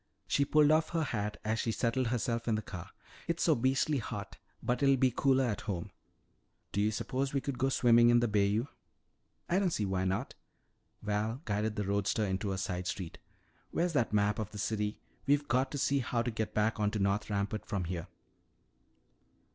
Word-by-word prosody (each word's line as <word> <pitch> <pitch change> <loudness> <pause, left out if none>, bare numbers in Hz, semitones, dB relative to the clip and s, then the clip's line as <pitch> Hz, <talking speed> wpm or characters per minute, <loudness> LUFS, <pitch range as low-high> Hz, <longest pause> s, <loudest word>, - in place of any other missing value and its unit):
She 140 - +2
pulled 150 +1 +5
off 155 0 +3
her 165 -1 +1
hat 105 -6 -3
as 110 +1 0
she 115 - 0
settled 120 +2 0
herself 115 0 -1
in 115 - +2
the 110 - -2
car. 90 -3 -8 0.4
"It's 170 0 0
so 160 - +5
beastly 135 +3 +1
hot, 105 -3 -6 0.3
but 125 +2 0
it'll 135 -1 +5
be 130 0 +3
cooler 135 -1 +3
at 110 -5 -1
home. 90 -4 -3 0.8
Do 100 - 0
you 105 - +3
suppose 135 +5 -2
we - - +3
could 135 -1 -4
go 135 - +2
swimming 120 -2 +5
in 120 0 +6
the 120 - +2
bayou?" 105 +2 +2 0.8
"I 180 - +2
don't 195 -2 +2
see 110 -10 -1
why 95 -1 -1
not." 95 +8 -1 0.7
Val 105 +5 -1
guided 105 +1 -1
the 105 -2 -2
roadster 100 +2 +1
into 95 +1 -1
a 95 - -2
side 90 -1 -3
street. 90 -4 -5 0.5
"Where's 175 0 0
that 130 -6 +1
map 105 0 +2
of 105 -2 -3
the 105 - -10
city? 105 0 -1 0.3
We've 145 +1 +3
got 130 +2 +2
to 145 - -4
see 140 0 +2
how 120 -1 -1
to 120 - -2
get 110 -1 -3
back 110 +1 +1
on 105 -1 +2
to 105 - -3
North 100 +1 0
Rampart 100 +1 -2
from 100 -3 -1
here." 85 -1 -4
110 Hz, 200 wpm, -32 LUFS, 105-130 Hz, 0.8 s, in